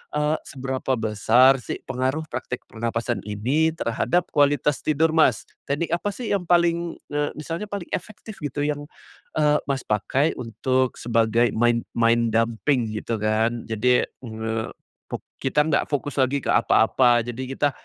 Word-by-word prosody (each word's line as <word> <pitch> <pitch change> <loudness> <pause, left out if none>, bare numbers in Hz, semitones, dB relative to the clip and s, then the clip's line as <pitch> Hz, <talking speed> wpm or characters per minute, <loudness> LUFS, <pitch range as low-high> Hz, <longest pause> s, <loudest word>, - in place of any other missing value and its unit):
eee, 150 +1 +1
seberapa 130 0 -2
besar 115 +4 +4
sih - - -5
pengaruh 130 +5 -1
praktek 125 - -5
pernapasan 115 +1 -3
ini 130 +10 +1
terhadap 170 +6 0
kualitas 145 -1 +2
tidur, 155 +1 +1
Mas? 145 -9 +3 0.2
Teknik 155 +4 -1
apa 190 +4 0
sih 240 -5 -3
yang 180 -4 -1
paling, 170 -1 +2 0.2
eee, 145 0 0
misalnya 165 +7 -5
paling 200 -4 -6
efektif 215 0 -6
gitu 145 0 -2
yang, 145 0 -3 0.5
eee, 150 -1 +3
Mas, 135 -2 -1
pakai 130 +9 +1
untuk 130 +2 -1
sebagai 115 0 +2
main 120 +1 +2
main 115 0 +2
dumping 115 +2 +1
gitu 110 0 -3
kan. 110 +2 0
Jadi, 125 +3 +3
eee, 110 -2 -5 0.4
fok - - -6 0.2
kita 140 +3 +2
nggak 150 -1 +1
fokus 145 0 -2
lagi 135 +1 +1
ke - - 0
apa-apa, 120 +2 +4
jadi 120 +2 -5
kita, 145 -1 +2
130 Hz, 150 wpm, -24 LUFS, 115-150 Hz, 0.5 s, besar